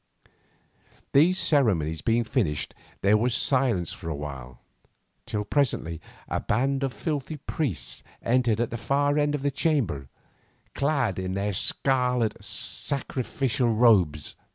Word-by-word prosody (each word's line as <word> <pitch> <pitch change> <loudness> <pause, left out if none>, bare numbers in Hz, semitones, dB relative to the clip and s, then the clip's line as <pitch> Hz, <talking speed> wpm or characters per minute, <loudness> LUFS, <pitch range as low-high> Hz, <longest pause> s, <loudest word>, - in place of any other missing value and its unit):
These 165 +7 +5
ceremonies 90 - +2
being 115 +6 +2
finished, 110 - -1 0.3
there 100 +2 +5
was 120 +2 +1
silence 125 - +1
for 85 - -7
a 80 - -2
while, 65 -4 -7 0.7
till 105 -1 -2
presently 105 - 0 0.3
a - - -1
band 135 +5 0
of 135 -1 0
filthy 150 0 -3
priests 135 - -3 0.2
entered 120 -2 +2
at 120 - 0
the 120 - -3
far 145 +6 +1
end 145 0 +1
of 140 - -4
the 140 - +1
chamber, 135 - 0 0.6
clad 140 -9 0
in 95 0 -3
their 100 +1 -1
scarlet 125 +2 +1
sacrificial 130 -2 -1
robes. 100 -10 +3
120 Hz, 130 wpm, -26 LUFS, 95-140 Hz, 0.7 s, These